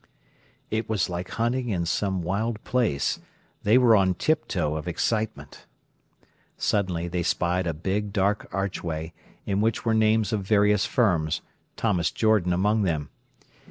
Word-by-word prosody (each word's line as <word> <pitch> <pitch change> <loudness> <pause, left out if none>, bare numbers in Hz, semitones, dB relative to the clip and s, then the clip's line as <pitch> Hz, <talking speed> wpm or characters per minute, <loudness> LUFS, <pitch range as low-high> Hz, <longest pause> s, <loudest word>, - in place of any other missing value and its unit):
It 110 +1 -2
was 105 -5 0
like 90 +1 -4
hunting 120 +2 -1
in 90 -5 -1
some 95 +1 -1
wild 105 +5 -2
place. 115 - 0 0.4
They 110 +4 +4
were 120 -3 +6
on 95 -2 +3
tiptoe 90 - 0
of 80 +1 -5
excitement. 110 +5 -2 0.9
Suddenly 90 -4 0
they 90 0 -2
spied 90 +1 0
a 85 - 0
big, 100 +5 -2
dark 100 +1 0
archway, 85 -4 -3 0.3
in 100 0 0
which 115 +2 0
were 115 - +2
names 110 0 +2
of 105 - 0
various 105 0 +3
firms, 85 - +1 0.4
Thomas 90 -7 +1
Jordan 110 -5 +2
among 105 +5 +2
them. 80 -7 -1
100 Hz, 140 wpm, -25 LUFS, 85-110 Hz, 0.9 s, were